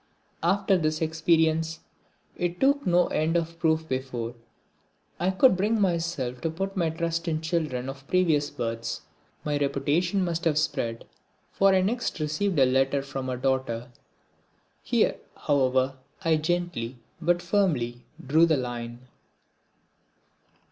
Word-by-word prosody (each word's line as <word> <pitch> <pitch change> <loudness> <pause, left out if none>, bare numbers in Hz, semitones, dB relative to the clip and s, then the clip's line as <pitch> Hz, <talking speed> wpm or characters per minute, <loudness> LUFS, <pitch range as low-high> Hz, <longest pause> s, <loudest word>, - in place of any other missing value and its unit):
After 190 +2 +2
this 155 -1 0
experience 160 0 +1 0.5
it 175 0 -2
took 280 -1 +2
no 175 0 +4
end 160 +2 +1
of 165 0 -3
proof 160 -1 +1
before 130 -3 -3 0.9
I 180 - +1
could 190 +4 +5
bring 210 +4 +1
myself 165 -10 -1
to 165 - 0
put 195 +5 -4
my 170 -4 +1
trust 165 +1 -2
in 155 -1 0
children 155 -6 -2
of 135 0 -8
previous 160 -6 +2
births. 115 -2 -4 0.4
My 145 -1 0
reputation 170 +7 +1
must 170 0 -2
have 155 -3 +2
spread 130 -7 -1 0.5
for 195 -1 +4
I 185 - +4
next 230 0 -1
received 155 +5 -1
a 135 - +6
letter 135 +2 +2
from 135 -1 -5
a 125 - -2
daughter. 130 -2 -1 0.9
Here, - - +1 0.2
however, 130 -1 +1 0.3
I 160 -1 +4
gently 160 -7 -2 0.2
but 175 +1 +2
firmly 150 - 0 0.2
drew 160 +5 +5
the 160 -3 +3
line. 120 -1 -5
160 Hz, 135 wpm, -27 LUFS, 130-175 Hz, 0.9 s, a